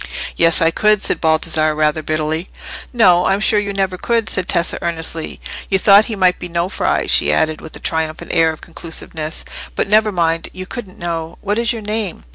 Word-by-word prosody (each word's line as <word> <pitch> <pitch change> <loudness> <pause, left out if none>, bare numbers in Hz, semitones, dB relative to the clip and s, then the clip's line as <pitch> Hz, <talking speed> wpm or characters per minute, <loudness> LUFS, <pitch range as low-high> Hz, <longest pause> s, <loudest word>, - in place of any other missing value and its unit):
"Yes, 165 0 +5
I 165 - +3
could," 210 +2 +2
said - - 0
Baldassarre, 155 -1 +2
rather 155 0 +1
bitterly. 155 +3 -2 0.4
"No, 180 -8 +4
I'm 195 +1 +2
sure 215 0 +3
you 200 -1 -3
never 190 -2 -2
could," 230 -2 0
said 185 -1 -1
Tessa, 170 -1 0
earnestly. 165 -1 -4 0.3
"You 195 - +3
thought 200 +2 +6
he 225 - -4
might 185 -2 +2
be 180 - -6
Nofri," 170 +2 -1
she 75 - +3
added, 155 - 0
with 160 - -9
a - - -10
triumphant 160 -1 -3
air 165 0 +4
of 155 - -11
conclusiveness. 160 -1 -6 0.3
"But - - -1
never 215 +1 +3
mind; 165 -3 0
you 185 0 -7
couldn't 200 -3 -8
know. 165 -1 -5
What 205 +2 -1
is 235 +1 +1
your 225 -3 -5
name?" 210 -3 -3
175 Hz, 195 wpm, -17 LUFS, 160-200 Hz, 0.4 s, thought